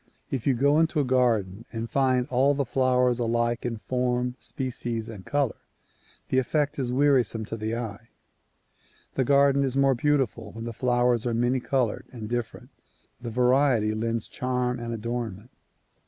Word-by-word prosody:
If 130 -2 -2
you 135 - +4
go 140 +5 +3
into 160 -1 +2
a - - +3
garden 115 -6 +1
and 115 0 -4
find 130 0 +2
all 135 +2 +3
the 140 0 0
flowers 125 0 +2
alike 120 0 0
in 115 -1 -3
form, 125 +1 -1
species 120 -3 -4
and 105 -5 -9
color, 145 -5 0 0.7
the 130 - +3
effect 145 +3 0
is 125 -2 -1
wearisome 125 -5 +2
to 110 - -5
the 110 +1 -3
eye. 115 0 -6 1.0
The 130 - +1
garden 140 +1 +4
is 135 -1 -1
more 135 -1 +4
beautiful 125 -5 0
when 115 +1 -7
the 120 - -5
flowers 120 0 +1
are 115 - 0
many 120 +2 +1
colored 125 -3 -1
and 115 -4 -7
different; 120 0 -4 0.5
the 120 - -5
variety 125 -2 +3
lends 115 0 -2
charm 125 -1 -2
and 120 0 -5
adornment. 115 -1 -4
125 Hz, 160 wpm, -26 LUFS, 115-130 Hz, 1.0 s, you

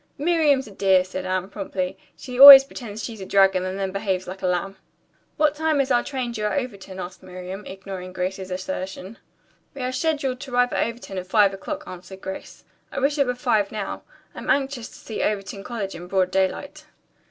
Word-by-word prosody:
"Miriam's 295 -3 +2
a 215 - -12
dear," 190 -1 +3
said 185 0 -6
Anne 185 0 -1
promptly. 190 -2 -4 0.2
"She 250 -1 -7
always 275 -1 +13
pretends 225 -5 -8
she's 225 -4 -6
a - - -5
dragon 195 -2 +4
and 185 +1 -4
then 195 -1 -2
behaves 190 -2 -2
like 190 +1 -7
a - - 0
lamb." 185 +2 -1 0.6
"What 300 -1 +3
time 310 -1 0
is 270 -1 +1
our 240 -1 +3
train 255 -4 -3
due 215 -2 -3
at 210 - 0
Overton?" 200 -8 -5
asked 180 +1 -7
Miriam, 185 +2 -8
ignoring 190 -1 -8
Anne's 185 +2 -2
assertion. 190 +2 -5 0.6
"We 270 - -5
are 255 - -1
scheduled 270 -2 -1
to 265 -1 -9
arrive 245 -1 +3
at - - +1
Overton 230 -5 -6
at 185 - -8
five 200 0 +4
o'clock," 290 +10 -6
answered 185 +1 -10
Grace. 190 0 -8 0.3
"I - - -3
wish 285 +2 +1
it 280 - +3
were 250 - -1
five 225 -6 +1
now. 210 -2 -5 0.3
I'm - - -8
anxious 270 -4 0
to - - -16
see 220 - -6
Overton 195 -1 -2
College 205 -4 -4
in 175 +1 -9
broad 185 -1 +1
daylight." 285 +11 -2
200 Hz, 200 wpm, -23 LUFS, 190-260 Hz, 0.6 s, always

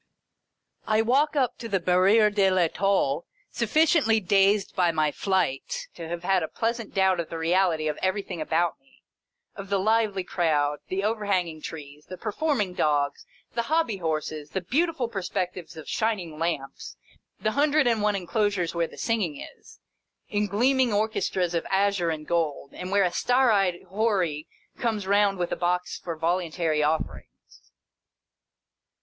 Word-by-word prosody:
I 220 +1 +3
walk 280 +6 +2
up 255 -4 0
to 230 - -6
the 195 -2 +1
Barri^re 195 +5 +4
de 200 -2 +4
1'Etoile, 180 -4 +1 0.3
suffi 235 +7 +2
ciently 225 - +2
dazed 195 +1 +3
by 180 -3 +3
my 155 -2 +1
flight 185 -7 -1
to 165 -2 -8
have 175 +1 -5
a 185 -4 +2
pleasant 230 +2 -3
doubt 190 -2 +3
of 170 - -3
the 165 - -5
reality 165 -1 +1
of 150 - -3
everything 190 -3 -2
about 165 +2 0
me; 270 -1 -29 0.5
of 195 -1 -8
the 200 - +2
lively 210 -1 +1
crowd, 150 -5 0
the 190 +1 -2
overhanging 200 -7 -1
trees, 150 -2 -9
the 185 - -8
performing 215 - -1
dogs, 145 -4 0 0.3
the 235 - 0
hobby 315 -10 +1
horses, 155 -3 -3
the 190 - -3
beautiful 305 - 0
perspectives 180 -5 -4
of 155 - -9
shining 185 -9 -2
lamps: 160 - -4 0.4
the 215 - 0
hundred 290 +3 +3
and 230 -3 +2
one 210 -1 +2
inclosures, 195 -1 -1
where 170 -1 0
the - - -15
singing 200 -11 -1
is, - - -13 0.5
in 210 0 0
gleaming 250 +5 +2
orchestras 205 -4 0
of 170 - 0
azure 195 -3 +1
and 155 -2 -4
gold, 155 -5 -1
and 180 - -6
where 200 +1 +3
a 180 - +1
star 250 +5 +3
eyed 190 -4 +1
Houri 190 -8 0 0.3
comes 220 -4 -1
round 200 0 +3
with 175 -1 -2
a - - 0
box 180 0 -1
for 170 -2 -5
voluntary 165 -1 0
offerings. 155 +1 -4
190 Hz, 155 wpm, -26 LUFS, 165-215 Hz, 0.5 s, Barri^re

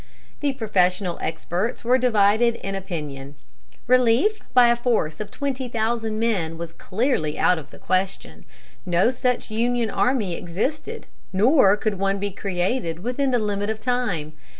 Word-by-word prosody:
The 285 -2 0
professional 185 -6 +1
experts 175 +9 -3
were 250 +2 +3
divided 230 -1 +3
in 195 -3 -5
opinion. 150 -7 -6 0.5
Relief 255 - +3
by 245 -1 +6
a 235 - +4
force 230 -11 0
of 210 - -5
twenty 270 -2 -3
thousand 225 -1 -1
men 190 -8 -1
was 170 0 -6
clearly 185 - -1
out 180 - +3
of 150 - -12
the - - -14
question. 185 +1 -2 0.4
No 180 +5 +2
such 250 -2 -1
Union 235 0 0
army 235 -8 +1
existed, 275 - -4 0.3
nor 205 +1 +5
could 210 -2 -2
one 195 0 +1
be 200 +1 -3
created 180 -2 -2
within 255 +3 0
the 250 - +2
limit 205 -2 -1
of 220 0 -3
time. 220 -12 -1
215 Hz, 150 wpm, -23 LUFS, 180-245 Hz, 0.5 s, by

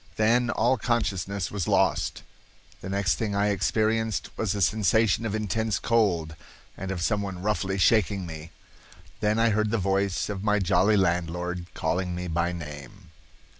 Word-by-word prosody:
Then 120 +3 +2
all 120 +2 +2
consciousness 100 -5 -1
was 100 -5 -3
lost. - - +1 0.6
The 95 - -7
next 95 -5 0
thing 105 -3 -1
I 100 +1 +2
experienced 110 +2 0
was 105 -3 -1
a 100 - -2
sensation 110 +2 +2
of 105 - -3
intense 110 +1 -1
cold, 90 -9 +1 0.4
and 95 - -6
of 90 -3 -3
someone 100 -2 -2
roughly 100 -2 -1
shaking 100 -1 +2
me. 80 -1 -8 0.7
Then 105 0 +1
I 115 0 +3
heard 110 +1 +1
the 115 - 0
voice 95 -1 0
of 100 -2 -5
my 105 -1 +2
jolly 95 +2 +3
landlord 90 -1 -1
calling 90 +2 -1
me 90 0 -4
by 85 +1 0
name." 75 -3 -9
100 Hz, 155 wpm, -26 LUFS, 90-110 Hz, 0.7 s, I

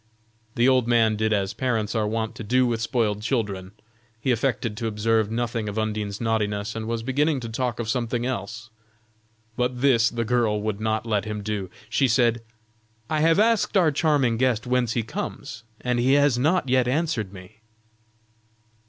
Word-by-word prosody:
The 120 +2 +3
old 130 -3 +3
man 115 -2 +3
did 110 +1 0
as 100 -2 0
parents 115 -5 -1
are 110 -2 0
wont 110 0 -2
to - - -8
do 125 +4 +2
with 115 -2 -1
spoiled 110 -3 0
children. 105 -5 -2 0.5
He 130 - 0
affected 115 -2 -1
to 115 - -2
observe 110 0 +1
nothing 115 -1 -2
of 105 - -6
Undine's 105 -2 -2
naughtiness 110 -2 -1
and 110 -1 -4
was 115 -1 -2
beginning 145 +3 +1
to 115 - -6
talk 120 0 -2
of 115 - -3
something 120 0 -1
else. 110 -3 -5 0.8
But 125 0 -1
this 120 -4 +4
the 115 -1 -3
girl 115 -3 +1
would 110 -1 -3
not 110 +1 -1
let 105 -3 0
him 105 -1 -4
do; 100 -3 -3 0.2
she 135 +4 +2
said: 120 -1 +2 0.7
"I 155 - +1
have 165 +1 +4
asked 220 -1 +3
our 170 -5 +4
charming 140 -6 +2
guest 125 -2 +1
whence 125 -2 +1
he 115 - 0
comes, 110 0 -6 0.2
and 125 -1 0
he 130 +3 +3
has 145 -2 +4
not 155 +6 +1
yet 130 -1 +2
answered 130 - -1
me." 95 +2 -13
115 Hz, 180 wpm, -24 LUFS, 110-125 Hz, 0.8 s, this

